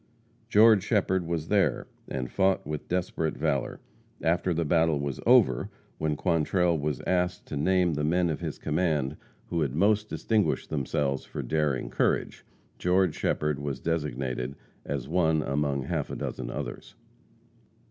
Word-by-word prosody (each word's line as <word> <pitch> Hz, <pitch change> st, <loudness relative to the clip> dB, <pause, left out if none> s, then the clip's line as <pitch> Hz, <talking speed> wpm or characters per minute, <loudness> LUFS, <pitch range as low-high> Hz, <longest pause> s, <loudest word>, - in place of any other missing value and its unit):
George 110 Hz, -3 st, +6 dB
Shepherd 95 Hz, -2 st, +1 dB
was 80 Hz, -2 st, -2 dB
there, 100 Hz, -2 st, +2 dB, 0.2 s
and 65 Hz, -2 st, -4 dB
fought 95 Hz, 0 st, +2 dB
with 75 Hz, 0 st, -5 dB
desperate 90 Hz, -3 st, -1 dB
valor. -, -, -1 dB, 0.4 s
After 85 Hz, +2 st, +1 dB
the 85 Hz, 0 st, 0 dB
battle 80 Hz, -1 st, +2 dB
was 70 Hz, -1 st, -3 dB
over, 115 Hz, -, +5 dB, 0.3 s
when 80 Hz, -1 st, 0 dB
Quantrell 85 Hz, +1 st, +1 dB
was 75 Hz, -3 st, -2 dB
asked 90 Hz, 0 st, 0 dB
to -, -, -4 dB
name 90 Hz, +3 st, +2 dB
the 75 Hz, 0 st, -2 dB
men 85 Hz, +2 st, +2 dB
of 75 Hz, -, -3 dB
his -, -, -4 dB
command 75 Hz, -3 st, 0 dB, 0.3 s
who 85 Hz, -, 0 dB
had 70 Hz, -3 st, -1 dB
most 105 Hz, +4 st, +2 dB
distinguished 110 Hz, -2 st, 0 dB
themselves 70 Hz, -1 st, -1 dB
for -, -, -6 dB
daring 75 Hz, 0 st, -1 dB
courage, -, -, 0 dB, 0.4 s
George 90 Hz, -2 st, +2 dB
Shepherd 75 Hz, -2 st, -1 dB
was 70 Hz, -2 st, -4 dB
designated 70 Hz, -5 st, -2 dB, 0.3 s
as 70 Hz, -2 st, -4 dB
one 80 Hz, -2 st, +2 dB
among 70 Hz, -1 st, -1 dB
half 75 Hz, 0 st, -2 dB
a -, -, -4 dB
dozen -, -, -4 dB
others. -, -, -6 dB
80 Hz, 145 wpm, -28 LUFS, 70-90 Hz, 0.4 s, George